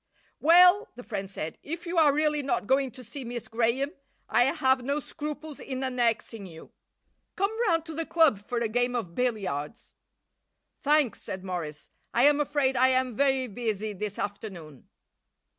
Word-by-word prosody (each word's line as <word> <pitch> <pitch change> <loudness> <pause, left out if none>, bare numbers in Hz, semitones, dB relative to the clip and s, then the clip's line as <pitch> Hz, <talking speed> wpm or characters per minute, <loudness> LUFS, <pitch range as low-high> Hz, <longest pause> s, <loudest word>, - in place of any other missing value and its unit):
"Well," 360 +5 +6
the 245 - -10
friend 200 -5 -5
said, 160 -4 -6
"if 335 +4 -6
you 340 0 0
are 300 -2 +6
really 300 +1 +1
not 270 -6 -1
going 265 +3 +2
to 255 - -10
see 270 +4 -7
Miss 240 -1 -6
Graham 235 +5 0 0.4
I 245 - +4
have 265 -1 +2
no 280 +4 -1
scruples 300 0 -7
in 260 0 -5
annexing 230 -4 -1
you. 165 -2 -13 0.6
Come 395 +3 0
round 330 -3 +2
to 325 - -7
the 325 +1 -3
club 320 -10 +4
for 225 +4 -5
a 235 -1 +1
game 245 +2 +1
of 185 -8 -3
billiards." 210 - -3 0.9
"Thanks," 290 -6 +2
said 190 0 -6
Morris, 165 -6 -5 0.2
"I 240 - +4
am 290 +1 +5
afraid 290 -2 +1
I 255 +1 +5
am 255 -2 +1
very 265 0 +2
busy 215 -2 -3
this 205 +1 -5
afternoon." 190 - -7
255 Hz, 165 wpm, -27 LUFS, 215-290 Hz, 0.9 s, Well